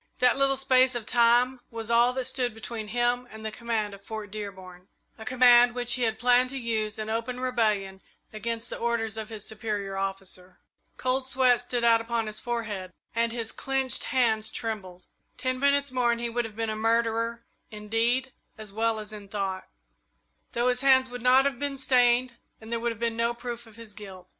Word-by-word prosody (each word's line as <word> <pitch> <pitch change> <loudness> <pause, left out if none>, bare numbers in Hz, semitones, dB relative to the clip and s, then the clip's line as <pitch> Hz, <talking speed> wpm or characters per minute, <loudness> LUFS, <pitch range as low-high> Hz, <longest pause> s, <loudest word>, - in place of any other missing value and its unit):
That 250 -1 +4
little 275 0 +2
space 260 -1 +4
of 235 -3 -3
time 245 +2 +3
was 225 0 -5
all 235 +1 +5
that 260 0 -2
stood 250 -3 -1
between 225 -1 -6
him 245 +2 0
and 220 0 -10
the 220 - -3
command 220 -2 -2
of 200 0 -12
Fort 215 -2 -7
Dearborn 190 -3 -8 0.3
a 220 - -8
command 245 -1 +6
which 245 -1 +2
he 250 - 0
had 225 -2 +1
planned 250 +1 +4
to 270 - -5
use 220 -3 -2
in 215 0 -4
open 230 +3 -3
rebellion 215 -6 0 0.3
against 230 +2 -4
the - - -5
orders 230 -2 -1
of 220 0 -4
his 215 -2 -7
superior 210 -3 -4
officer. 195 -1 -4 0.4
Cold 260 +1 -1
sweat 255 -2 +3
stood 245 -1 -2
out 230 -1 +5
upon 230 0 -2
his 215 0 -4
forehead, 215 -6 -4 0.2
and 230 0 +1
his 230 -1 -2
clenched 270 -1 +1
hands 225 -5 +2
trembled. 185 -5 -5 0.3
Ten 255 0 -2
minutes 280 0 +2
more 250 -2 +2
and 235 - -1
he 235 0 -3
would 240 0 -1
have 220 -2 -9
been 225 0 -2
a - - -3
murderer 230 +1 0 0.3
in 210 -1 -10
deed 240 +4 +1 0.3
as 215 -2 -9
well 225 +1 +1
as 215 0 -7
in 205 -1 -9
thought, 195 -2 -3 0.9
though 240 +1 +2
his 250 0 0
hands 260 -1 +5
would 245 -1 -6
not 255 +2 +5
have 275 -4 -1
been 285 -1 -2
stained 250 -2 +3 0.2
and 220 +1 -11
there 235 - 0
would 235 +1 -1
have 230 - -7
been 230 -1 -1
no 235 +1 0
proof 240 -1 -7
of 220 - -16
his 230 -2 -11
guilt. 190 -3 -11
230 Hz, 200 wpm, -27 LUFS, 215-250 Hz, 0.9 s, command